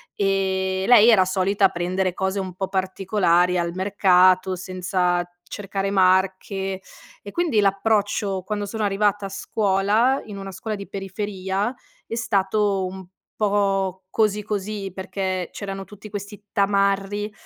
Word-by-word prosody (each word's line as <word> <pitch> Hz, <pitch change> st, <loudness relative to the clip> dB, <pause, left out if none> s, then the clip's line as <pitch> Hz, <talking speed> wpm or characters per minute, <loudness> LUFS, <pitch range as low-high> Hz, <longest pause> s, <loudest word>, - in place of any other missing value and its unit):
e, 190 Hz, -1 st, 0 dB
lei 240 Hz, -1 st, +7 dB
era 195 Hz, -5 st, +6 dB
solita 195 Hz, +1 st, +2 dB
prendere 185 Hz, +1 st, -1 dB
cose 190 Hz, +1 st, -1 dB
un 185 Hz, -2 st, -4 dB
po' 190 Hz, +1 st, -3 dB
particolari 185 Hz, -2 st, +1 dB
al 170 Hz, -1 st, -1 dB
mercato, 185 Hz, -1 st, +3 dB
senza 180 Hz, -1 st, -1 dB, 0.2 s
cercare 195 Hz, 0 st, -4 dB
marche; 190 Hz, 0 st, +1 dB, 0.4 s
e 200 Hz, -, -8 dB
quindi 330 Hz, -11 st, +1 dB
l'approccio 200 Hz, -1 st, +1 dB
quando 205 Hz, +1 st, -3 dB
sono 220 Hz, +1 st, -3 dB
arrivata 205 Hz, 0 st, +1 dB
a -, -, -5 dB
scuola, 205 Hz, +5 st, +1 dB
in 205 Hz, -2 st, -8 dB
una 195 Hz, 0 st, -7 dB
scuola 215 Hz, +4 st, -4 dB
di 200 Hz, -, -8 dB
periferia, 195 Hz, +2 st, -3 dB, 0.3 s
è -, -, -8 dB
stato 205 Hz, -3 st, +1 dB
un 190 Hz, 0 st, -7 dB, 0.3 s
po' 195 Hz, -3 st, 0 dB
così 210 Hz, -1 st, +1 dB
così, 205 Hz, -1 st, -4 dB
perché 190 Hz, -1 st, -3 dB
c'erano 195 Hz, -1 st, -6 dB
tutti 210 Hz, +1 st, -12 dB
questi 205 Hz, 0 st, -7 dB
tamarri, 200 Hz, +1 st, +1 dB
195 Hz, 130 wpm, -23 LUFS, 190-205 Hz, 0.4 s, lei